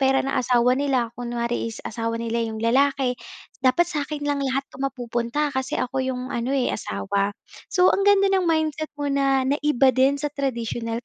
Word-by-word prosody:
pera 270 0 +3
ng 275 - -2
asawa 250 -1 +3
nila 255 -4 0
kunwari 235 -1 -3
is 225 - -8
asawa 230 0 -3
nila 230 0 -2
yung 220 - -5
lalaki, 255 +2 +2 0.4
"dapat 260 +7 +4
sa'kin 295 -2 -4
lang 285 -1 0
lahat 270 0 -1
'to 270 - -13
mapupunta 250 +2 -2
kasi 265 0 -2
ako 255 +1 -1
yung 255 -1 -3
ano 250 +4 -1
eh, 255 - +1
asawa." 200 - -2 0.3
So, 365 0 +4
ang - - +1
ganda 395 -1 +4
ng 375 -3 +2
mindset 315 -1 0
mo 290 -1 -2
na 275 -1 +2
naiba 280 -1 +3
din 265 +2 +3
sa 290 0 -3
traditonal 235 -4 -3
260 Hz, 180 wpm, -23 LUFS, 235-285 Hz, 0.4 s, dapat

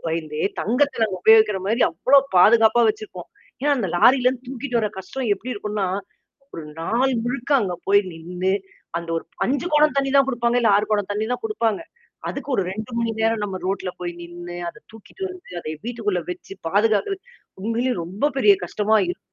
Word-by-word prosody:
பயந்தே 155 -2 -3 0.2
தங்கத்த 250 +5 +1
நாங்க 205 -4 +1
உபயோகிக்கிற 220 -2 +6
மாரி 225 +4 0
அவ்ளோ 280 +2 +4 0.2
பாதுகாப்பா 220 +4 +6
வச்சிருப்போம். 210 -5 -5 0.3
ஏன்னா, 290 +1 +1
அந்த 210 - -1
லாரிலருந்து 255 +3 +4
தூக்கிட்டு 260 -2 -2
வர 215 - 0
கஷ்டம் 240 +5 -4
எப்பிடி 250 +6 -6
இருக்குன்னா, 210 -1 -2 0.7
ஒரு 165 - -6 0.2
நாள் 245 +10 +1
முழுக்க 245 +2 -4
அங்க 185 -4 -1
போய் 200 0 +6
நின்னு 180 +3 -2 0.5
அந்த 170 - -8
ஒரு - - -4 0.2
5 280 +6 0
குடம் 300 -1 +4
தண்ணீ 275 -1 +1
தான் 275 - +5
குடுப்பாங்க, 240 -1 +1
இல்ல 225 -3 +4
6 210 - +1
குடம் 205 -1 0
தண்ணீ 210 +1 -1
தான் 250 - -3
குடுப்பாங்க. 235 - 0 0.5
அதுக்கு - - -6
ஒரு 195 - +2
2 220 +4 -6
மணி 230 -1 0
நேரம் 225 -1 +1
நம்ம 195 -2 -4
ரோட்ல 190 -1 -2
போய் 175 -1 -3
நின்னு, 175 0 -8
அத - - -11
தூக்கிட்டு 225 - -13
வந்து, 365 0 -12
அத - - -15 0.2
வீட்டுக்குள்ள 210 -6 -1
வச்சு 180 +2 -8
பாதுகாக்குற 215 - +2 0.5
உண்மையில 235 +3 0
ரொம்ப 200 - -1
பெரிய 210 -6 +6
கஷ்டமா 210 +4 +1
இரு 175 - -3
220 Hz, 175 wpm, -22 LUFS, 190-250 Hz, 0.7 s, உபயோகிக்கிற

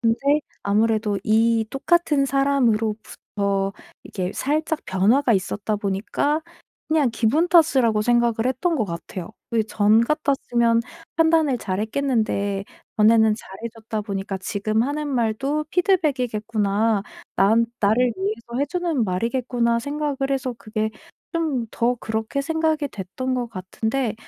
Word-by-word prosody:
근데 230 -2 +2 0.5
아무래도 210 0 +1
이 225 +1 +3
똑같은 295 0 +2
사람으로부터 215 -7 0 0.3
이게 185 -1 -4
살짝 310 +3 -1
변화가 220 +7 +3
있었다 205 +2 -1
보니까 205 +10 -1 0.5
그냥 305 -6 +2
기분 240 +10 +2
탓이라고 270 -11 +4
생각을 235 0 +2
했던 325 +7 0
것 220 -7 0
같아요. 170 +1 -6 0.2
이 225 -1 +3
전 215 +1 +4
같았으면 235 -4 +1 0.4
판단을 320 -5 +3
잘했겠는데 210 -1 -1 0.3
전에는 220 0 +5
잘해줬다 220 +1 -6
보니까 195 -2 -4
'지금 215 +3 -1
하는 295 +3 -2
말도 270 +4 0
피드백이겠구나. 225 - +1 0.3
난 225 +4 +4
나를 230 +4 +3
위해서 225 +5 -4
해 280 - +2
주는 335 -7 -1
말이겠구나.' 235 +4 0
생각을 290 +2 -3
해서 255 -2 -1
그게 215 0 -2 0.5
좀 290 -8 -1
더 245 +1 0
그렇게 220 +5 -2
생각이 315 0 0
됐던 255 +5 -4
것 245 -2 -2
같은데 220 +6 -2
230 Hz, 290 characters per minute, -23 LUFS, 215-275 Hz, 0.5 s, 전에는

